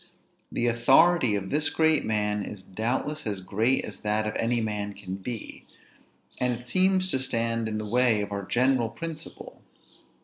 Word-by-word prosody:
The 120 Hz, -, -1 dB
authority 120 Hz, +2 st, +4 dB
of 95 Hz, -1 st, -4 dB
this 150 Hz, +2 st, +2 dB
great 160 Hz, -1 st, +3 dB
man 105 Hz, -1 st, 0 dB
is 100 Hz, -1 st, -8 dB
doubtless 125 Hz, +8 st, -2 dB
as 100 Hz, -2 st, -2 dB
great 110 Hz, +7 st, +1 dB
as -, -, -9 dB
that 105 Hz, +1 st, 0 dB
of 105 Hz, -, -3 dB
any 120 Hz, +1 st, +1 dB
man 105 Hz, -2 st, -3 dB
can 95 Hz, -2 st, -7 dB
be, 110 Hz, +4 st, -6 dB, 0.8 s
and 125 Hz, -1 st, +1 dB
it 125 Hz, -, -14 dB
seems 185 Hz, +6 st, +2 dB
to 130 Hz, -, +1 dB
stand 115 Hz, -3 st, -1 dB
in 110 Hz, -, -2 dB
the 110 Hz, -, -4 dB
way 120 Hz, -1 st, +3 dB
of 105 Hz, 0 st, -4 dB
our 100 Hz, 0 st, -2 dB
general 125 Hz, +2 st, +2 dB
principle. 165 Hz, +4 st, -8 dB
115 Hz, 170 wpm, -27 LUFS, 105-130 Hz, 0.8 s, authority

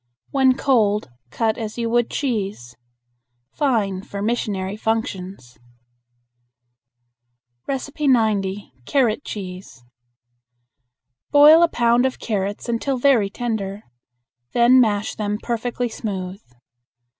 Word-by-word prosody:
When 265 Hz, -2 st, +4 dB
cold 210 Hz, -, +2 dB, 0.2 s
cut 220 Hz, -, -1 dB
as 220 Hz, 0 st, -5 dB
you 235 Hz, -1 st, -1 dB
would 240 Hz, -1 st, +2 dB
cheese. 200 Hz, -, -3 dB, 0.8 s
Fine 215 Hz, -10 st, 0 dB
for 200 Hz, 0 st, -8 dB
missionary 205 Hz, -3 st, -2 dB
functions. 190 Hz, -, -4 dB, 2.1 s
90. 230 Hz, -8 st, 0 dB
Carrot 260 Hz, -2 st, +1 dB
Cheese. 185 Hz, -, -8 dB, 1.5 s
Boil 300 Hz, +3 st, +8 dB
a 340 Hz, -, +6 dB
pound 240 Hz, -2 st, +2 dB
of 260 Hz, -, -5 dB
carrots 205 Hz, -1 st, -3 dB
until 240 Hz, +3 st, -1 dB
very 245 Hz, -6 st, +3 dB
tender. 210 Hz, -2 st, -4 dB, 0.7 s
Then 245 Hz, +2 st, +6 dB
mash 210 Hz, -2 st, 0 dB
them 210 Hz, -1 st, -2 dB
perfectly 240 Hz, +2 st, -3 dB
smooth. 195 Hz, -3 st, -5 dB
220 Hz, 95 wpm, -21 LUFS, 200-245 Hz, 2.1 s, Boil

